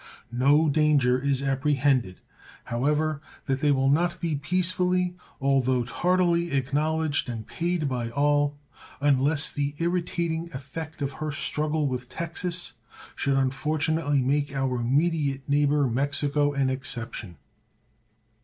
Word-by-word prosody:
No 145 +6 +4
danger 140 -4 +3
is 140 0 0
apprehended, 135 -6 +1 0.4
however, 150 +4 0 0.2
that 135 0 -1
they 150 -1 +3
will 135 -1 +2
not 170 +5 +2
be 165 -3 -1
peacefully, 180 +3 +1 0.2
although 130 -2 +2
tardily, 170 +5 +1
acknowledged 145 +2 0
and 115 -2 -5
paid 170 -2 -1
by 125 -3 -2
all, 145 +2 +1 0.4
unless 145 +1 +2
the 145 0 -2
irritating 170 -1 -1
effect 145 +3 -6
of 140 - -1
her 155 +2 -4
struggle 150 +1 -1
with 125 -2 -4
Texas 170 +3 -3 0.4
should 140 -1 +1
unfortunately 145 +1 +1
make 140 +2 0
our 135 -2 0
immediate 140 +2 0
neighbor, 145 0 +3
Mexico, 145 +3 +1
an 135 -2 +1
exception. 120 - -6
145 Hz, 115 wpm, -26 LUFS, 135-160 Hz, 0.4 s, No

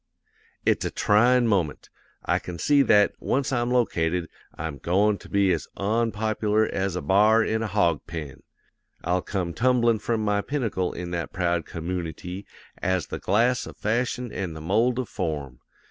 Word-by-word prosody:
"'It's - - +2
a - - -1
tryin' 120 +4 +3
moment. 90 -9 -1 0.3
I - - +2
can 90 -1 -7
see 145 - +4
that, 105 -6 +4
once 140 +1 0
I'm 120 -2 0
located, 90 -9 0 0.3
I'm 75 -3 -5
goin' 100 +7 +2
to - - -14
be 100 -2 +3
as 80 - -3
onpop'lar 110 0 +1
as 95 -2 -1
a 90 - -3
b'ar 105 +4 +4
in 110 0 -1
a 115 - -1
hawg 85 -7 +1
pen; 75 -4 -7 0.6
I'll 90 +2 +1
come 90 -4 -3
tumblin' 120 -1 +2
from 110 0 -1
my 105 -1 +1
pinnacle 110 -9 -2
in 90 0 -6
that 85 -1 -4
proud 85 -2 0
commoonity 90 +2 -5 0.3
as 95 -2 0
the - - -6
glass 120 +4 +1
of - - -11
fashion 120 +2 -1
an' 95 -4 -4
the 80 - -8
mold 115 +9 +2
of 130 -3 -2
form. 70 -6 -4
100 Hz, 165 wpm, -25 LUFS, 85-115 Hz, 0.6 s, see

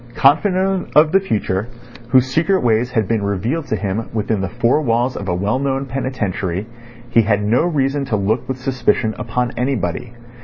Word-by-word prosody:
Confident 185 +6 +2
of 155 +1 +6
the 195 - +5
future, 105 - -1 0.4
whose 130 +1 +5
secret 160 +8 +1
ways 120 +1 +2
had 110 -5 0
been 115 -2 0
revealed 110 - -2
to - - 0
him 105 +2 -3
within 110 -2 -1
the 95 - -2
four 120 +6 +1
walls 120 -1 0
of 100 - -5
a 90 - 0
well 100 +7 0
known 135 0 -1
penitentiary, 105 -8 -3 0.5
he 115 - +5
had 105 -1 +1
no 115 +9 +2
reason 140 -4 0
to 120 - -1
look 105 +4 0
with 130 - -2
suspicion 130 -3 0
upon 125 0 -1
anybody. 120 -3 -2
120 Hz, 180 wpm, -19 LUFS, 105-135 Hz, 0.5 s, of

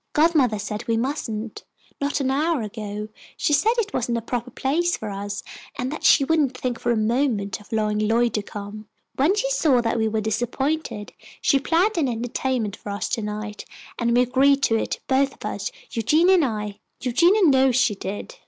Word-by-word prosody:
"Godmother 295 -8 +3
said 210 +2 -5
we 230 -1 +1
mustn't. 230 -4 -3 0.4
Not 285 +1 0
an 265 -1 0
hour 300 -1 +1
ago, 210 0 -6 0.3
she 295 - +1
said 440 +10 +4
it 420 -3 -1
wasn't 240 -1 0
a - - -2
proper 245 +1 -3
place 335 +8 0
for 215 -2 -5
us, 200 0 -5 0.3
and 250 +2 -2
that 310 - -6
she 285 - +6
wouldn't 285 -3 +1
think 245 -3 -3
for 240 - 0
a 235 - +1
moment 215 -3 0
of 210 - -19
allowing 215 -1 0
Lloyd 230 +2 +2
to 210 - 0
come. 205 +1 -8 0.3
When 305 +9 +3
she - - 0
saw 310 - +3
that 230 0 0
we 220 - +2
were 220 0 0
disappointed, 235 +2 -2 0.3
she 275 - +3
planned 345 +7 +1
an 290 - +2
entertainment 235 -2 -2
for - - -9
us 200 0 -2
to 230 - -1
night, 210 0 -5 0.4
and 235 0 +2
we 250 - +6
agreed 275 +3 +3
to 225 - +3
it, 225 - -2
both 270 +1 +2
of - - -11
us, - - -3 0.2
Eugenia 310 - +3
and 345 -5 +4
I. 210 -4 -4 0.2
Eugenia 340 - +3
knows 265 -4 +4
she 250 -4 +3
did." 205 - -6
245 Hz, 195 wpm, -23 LUFS, 215-285 Hz, 0.4 s, she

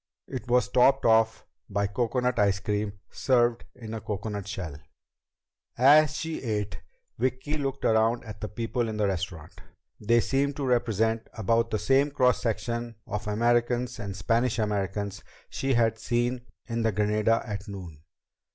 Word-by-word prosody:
It 130 -3 -6
was 125 +1 +3
topped 135 +2 +4
off 110 -1 +3 0.2
by 100 0 0
coconut 120 +4 0
ice 100 -1 +3
cream 105 +1 -2 0.2
served 120 -2 +2
in 115 -3 -8
a 110 - -4
coconut 105 -1 -4
shell. 90 -8 -5 1.0
As 150 +4 +6
she 160 -1 -4
ate, 105 -4 -3 0.4
Vicki 130 +4 -1
looked 140 -2 -3
around 115 +2 +3
at 105 -2 -9
the 105 - -2
people 115 +2 -2
in 110 - -4
the 105 - +2
restaurant. 90 -4 -4 0.4
They 115 +3 +3
seemed 140 +3 0
to 140 - -3
represent 115 -2 +1
about 115 +2 +1
the 110 - 0
same 135 +7 +3
cross 130 -3 +2
section 115 0 -2
of 105 0 -4
Americans 120 +3 +1
and 100 -4 -5
Spanish 115 +3 +1
Americans 100 -2 -2 0.3
she 135 -1 0
had 115 -1 +2
seen 120 +1 -1 0.2
in 115 -1 -2
the 115 -1 +2
Granada 105 +2 +1
at 105 -1 -5
noon. 90 -7 -8
115 Hz, 150 wpm, -27 LUFS, 105-125 Hz, 1.0 s, As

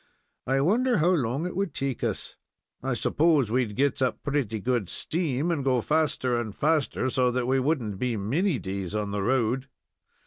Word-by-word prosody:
I 135 +1 +2
wonder 235 - +3
how 170 +2 +3
long 140 -2 0
it 180 - -4
would 190 -5 -2
take 135 -3 -2
us? - - -3 0.5
I - - -1
s'pose 150 -7 +2
we'd 120 -4 0
get 140 +2 +1
up 120 -4 0
pretty 135 -7 -1
good 120 -3 -1
steam, 160 -1 -1
and 150 -5 -1
go 130 -2 +2
faster 145 -4 +1
and 110 -3 -6
faster, 150 -4 +1
so 125 0 +2
that 125 0 -1
we 130 +1 +2
wouldn't 125 -8 -1
be 125 -3 -1
many 145 - 0
days 95 -2 -4
on 105 -1 -2
the 100 0 -1
road. 130 +3 +1
130 Hz, 180 wpm, -27 LUFS, 115-155 Hz, 0.5 s, wonder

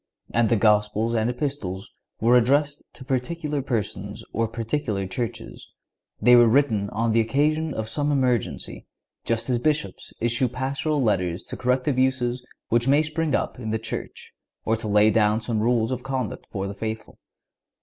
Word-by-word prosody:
And 115 -1 +3
the 115 - +4
Gospels 105 +1 +2
and 115 0 +1
Epistles 125 -8 -4 0.3
were 120 +2 +4
addressed 140 +4 +3
to 130 - -12
particular 150 +3 -2
persons 120 -6 -3
or 115 +1 +1
particular 115 -3 -2
churches. 115 +5 -5 0.5
They 125 0 +6
were 120 -1 +7
written 110 -6 +2
on 115 +2 0
the 115 - +3
occasion 150 +7 +1
of 110 0 -3
some 145 +6 -1
emergency, 125 -6 -1 0.4
just 115 -1 -1
as 125 -2 +1
Bishops 150 +3 -1
issue 120 +2 +1
Pastoral 135 +4 -1
letters 90 -5 0
to - - -7
correct 125 +2 0
abuses 130 -2 +1 0.3
which 120 +2 +2
may 145 +3 +4
spring 155 0 -1
up - - -2
in 110 -3 -5
the 110 - 0
Church, - - -6 0.3
or 110 - +2
to 110 0 -5
lay 105 +1 +4
down 105 0 +3
some 115 -1 -2
rules 115 0 +1
of 125 -1 -2
conduct 130 -3 -4
for 95 -1 -4
the 100 - -4
faithful. 110 +1 -6
120 Hz, 165 wpm, -24 LUFS, 110-135 Hz, 0.5 s, were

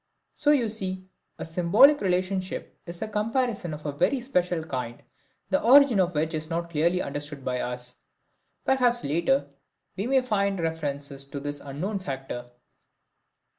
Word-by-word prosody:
So 295 - +1
you 275 -6 +4
see, 190 -3 -2 0.3
a - - -5
symbolic 180 - +5
relationship 185 0 -1
is 170 +4 -4
a - - -3
comparison 215 -3 -1
of 150 0 -8
a 145 - -1
very 180 - +1
special 180 -9 0
kind, 125 -6 -5 0.5
the - - +3
origin 260 -2 +6
of 180 -2 +1
which 160 +2 0
is 155 0 -2
not 170 0 -1
yet 170 - -15
clearly 170 +3 +1
understood 145 -1 -5
by 125 -1 -1
us. 125 0 -1 0.7
Perhaps 245 -2 +2
later 170 - +1 0.5
we 200 +4 -2
may 265 0 +3
find 200 -5 0
references 145 -4 -1
to 140 +1 -6
this 145 +1 -3
unknown 165 +10 -4
factor. 135 -6 -6
175 Hz, 155 wpm, -26 LUFS, 145-215 Hz, 0.7 s, origin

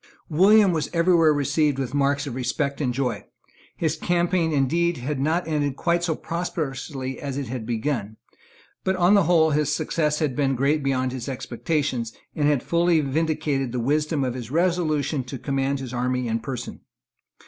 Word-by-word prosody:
William 195 +5 +5
was 155 -3 -1
every 170 +2 +3
where 165 -2 +5
received 145 0 +1
with 130 -2 -3
marks 140 0 +1
of 140 - -5
respect 140 +3 -2
and 130 -4 +1
joy. 125 -4 -2 0.5
His 160 -2 0
campaign 175 0 +1
indeed 165 +5 +1
had 130 +3 -3
not 160 +5 0
ended 145 -3 0
quite 170 +3 0
so 165 -3 0
prosperously 135 -6 -4
as 140 -2 -4
it 140 -5 -4
had 120 -3 -5
begun; 115 -3 -2 0.7
but 190 - +1
on 180 +2 +4
the 200 -4 +5
whole 160 -2 +4
his 150 0 +1
success 150 -1 0
had 150 -5 -1
been 135 -2 +1
great 140 +4 +1
beyond 130 -2 0 0.2
expectation, 135 0 -2 0.3
and 145 -1 +1
had 145 -4 +2
fully 170 -1 +2
vindicated 145 -2 -1
the 125 - -2
wisdom 150 +3 0
of 125 -2 -1
his 120 -3 -7
resolution 160 -3 0
to 130 +2 -6
command 135 +1 -1
his 130 -2 -6
army 125 0 -1
in 115 0 0
person. 125 +2 -6
145 Hz, 170 wpm, -24 LUFS, 130-160 Hz, 0.7 s, William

